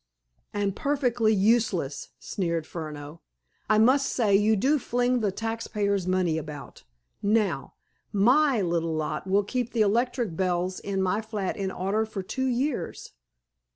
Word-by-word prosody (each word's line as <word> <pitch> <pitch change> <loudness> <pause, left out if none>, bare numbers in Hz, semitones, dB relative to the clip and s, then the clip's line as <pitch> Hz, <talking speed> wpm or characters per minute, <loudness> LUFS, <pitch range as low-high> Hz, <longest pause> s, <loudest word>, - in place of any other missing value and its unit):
"And 200 -2 -1
perfectly 245 -6 +1
useless!" 195 - +1
sneered 170 -4 -2
Furneaux. 155 -1 -7 0.5
"I 215 - +4
must 260 +5 +4
say 210 -5 +2
you 210 +2 +4
do 275 +9 +2
fling 245 0 +1
the 210 -3 0
taxpayers' 205 -3 -2
money 180 -3 +1
about. 150 -2 -9 0.4
Now, 200 -8 0 0.4
my 250 +4 +4
little 165 -2 0
lot 155 +3 -3
will 200 +2 +3
keep 245 +3 -3
the 230 - +2
electric 230 -2 +1
bells 185 0 -1
in 195 -1 -2
my 190 +3 +1
flat 210 -4 -3
in 195 -2 -2
order 195 +4 -1
for 200 -3 -5
two 260 +7 -2
years." 250 - -2
205 Hz, 140 wpm, -26 LUFS, 180-235 Hz, 0.5 s, I